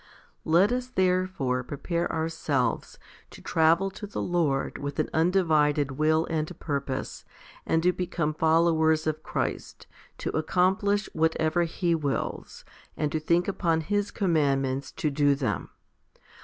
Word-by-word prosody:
13. - - -4
Let 185 +6 +5
us 250 0 -1
therefore 185 - 0
prepare 170 +6 -3
ourselves 160 -6 -1 0.3
to - - -13
travel 165 +4 +2
to 205 +2 -8
the 200 - -5
Lord 160 -6 0
with 145 0 -5
an - - -1
undivided 155 -5 +2
will 155 +3 +2
and 155 -1 -3
purpose, 140 -3 -4 0.4
and 165 0 +2
to 180 +1 +3
become 170 -4 -2
followers 160 0 +3
of 155 0 -2
Christ, - - -4 0.3
to - - -3
accomplish 190 +5 +1
whatever 160 +1 +1
He 170 +1 -1
wills, 145 -4 -3 0.3
and 150 -1 -1
to 155 - -1
think 170 +3 +1
upon 170 -5 0
His 205 +4 -1
commandments 140 -8 0
to 150 - -1
do 145 0 +3
them. 125 -9 -2
160 Hz, 135 wpm, -27 LUFS, 150-180 Hz, 0.4 s, Let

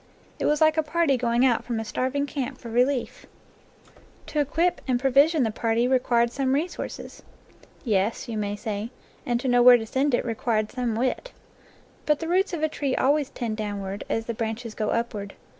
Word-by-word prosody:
It - - -1
was 300 0 +2
like 315 0 +4
a - - +4
party 315 -2 +1
going 240 0 +2
out 240 -3 +2
from 235 -2 -3
a 225 - -4
starving 260 +5 -1
camp 275 -1 -4
for 235 -3 -9
relief. 250 +2 0 1.0
To 300 - -3
equip 325 +5 +1
and 250 -2 +1
pro 270 +1 +1
10 - - -12
NATURE 275 - +6
LORE - - +10
vision 315 -2 0
the 220 - 0
party 230 +2 0
required 240 -2 +2
some 265 0 0
resources. 335 +5 -5 0.6
"Yes," 210 -2 0
you 230 - -4
may 205 -1 -2
say, 210 0 -4 0.4
"and 240 -1 +1
to 260 - -3
know 245 -1 +4
where 245 0 +9
to 225 - -5
send 265 +4 +1
it - - -2
re 230 - -1
quired 215 -1 -1
some 245 -3 -2
wit." 255 - -2 0.7
But 300 -1 +3
the 325 - -4
roots 370 +4 +2
of 330 -3 -3
a - - +4
tree 280 -3 -2
always 285 +1 +2
tend 225 -3 -4
downward, 205 -2 -4
as 225 - -1
the 235 - -3
branches 225 +1 -4
go 215 -1 -2
upward. 215 -4 -3
245 Hz, 210 wpm, -25 LUFS, 225-285 Hz, 1.0 s, LORE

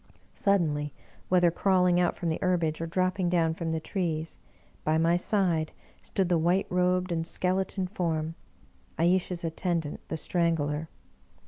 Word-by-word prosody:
Sud 200 -1 +3
denly, 150 -2 -2 0.4
whether 180 -2 +4
crawling 180 0 +3
out 175 -1 +2
from 170 - -2
the 160 - -1
herbage 170 -4 +1
or 165 - -2
dropping 185 +1 0
down 165 -2 +2
from 165 0 -3
the 160 - 0
trees, 160 -2 -3 0.4
by 155 +1 +2
my 165 +1 +3
side 175 -4 +1 0.3
stood 190 -2 -1
the 175 -2 +2
white 175 +4 +2
robed 180 0 +1
and 165 -1 -1
skeleton 185 +2 -1
form 165 -4 -2 0.3
— 65 0 -34
^Ayesha's 175 +1 +1
attendant 165 -1 -2
the 160 - -3
Strangler. 160 -2 0
170 Hz, 150 wpm, -28 LUFS, 160-180 Hz, 0.4 s, whether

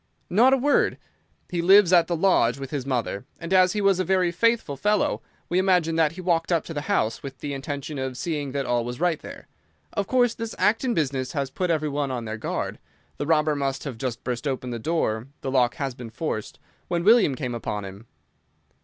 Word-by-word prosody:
"Not 235 +8 +5
a 270 - +5
word. 285 +3 +2 0.5
He 175 -1 0
lives 190 +1 +6
at 170 -2 +6
the 175 - 0
lodge 155 -9 +3
with 135 -1 -7
his 140 -3 -3
mother, 120 -6 -2 0.2
and 170 +2 -4
as 185 -1 +5
he 210 - -1
was 195 -2 +3
a - - +2
very 185 -1 +2
faithful 225 -5 +1
fellow 210 +9 +1 0.3
we 180 - +1
imagine 180 -4 +2
that 160 -1 +2
he 185 - -8
walked 170 -1 0
up 170 -2 +1
to 165 - -6
the 145 - -3
house 115 - +1
with 135 -1 -8
the 145 +2 -5
intention 140 +1 -5
of 130 -1 -4
seeing 150 -4 -3
that 140 0 -2
all 120 -1 +1
was 120 +2 -6
right 175 -2 +1
there. - - -10 0.5
Of 200 -1 -1
course 245 -2 +3
this 230 -1 -6
Acton 230 +3 +2
business 135 -4 -1
has 140 -3 -2
put 180 +4 -2
every 155 -2 +1
one 145 -1 -1
on 125 -3 -3
their 110 0 -5
guard. - - -3 0.4
The 145 - -3
robber 155 -2 +3
must 135 -1 -2
have 130 -6 -6
just 120 -2 -4
burst 125 +3 -3
open 130 -2 -3
the 120 - -4
door—the 135 -2 -2
lock 125 -2 +2
has 135 -2 -3
been 120 -2 -9
forced—when 155 +6 -5
William 210 - +5
came 125 -3 -4
upon 105 -3 -4
him." 100 +4 -10
150 Hz, 215 wpm, -25 LUFS, 130-180 Hz, 0.5 s, lives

